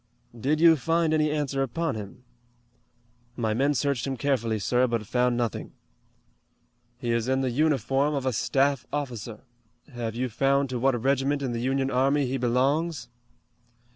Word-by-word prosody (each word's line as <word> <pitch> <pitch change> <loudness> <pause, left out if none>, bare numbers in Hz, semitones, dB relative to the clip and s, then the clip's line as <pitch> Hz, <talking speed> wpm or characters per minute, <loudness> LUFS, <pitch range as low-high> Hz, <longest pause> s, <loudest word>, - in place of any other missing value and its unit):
"Did 140 +7 0
you 165 -1 +6
find 165 +4 +1
any 155 -1 +2
answer 145 -2 -1
upon 160 +6 -1
him." 105 +2 -8 1.1
"My 110 -3 -1
men 140 +5 +1
searched 140 -1 0
him 135 -1 -3
carefully, 115 -4 0
sir, 125 +6 +1
but 115 -2 -2
found 125 +2 +1
nothing." 120 -3 -3 1.2
"He 120 -1 -3
is 115 0 0
in 130 +1 +1
the 130 -2 0
uniform 140 +1 +1
of 135 -2 -2
a 130 - 0
staff 135 +3 +1
officer. 120 -6 -5 0.5
Have 115 -2 -4
you 130 +2 -1
found 135 +3 +1
to 125 - -2
what 130 -1 +2
regiment 140 +3 0
in 130 - -2
the 115 -1 -3
Union 135 +1 0
army 135 +3 +2
he 130 +1 -2
belongs?" 130 +3 0
130 Hz, 160 wpm, -26 LUFS, 120-140 Hz, 1.2 s, you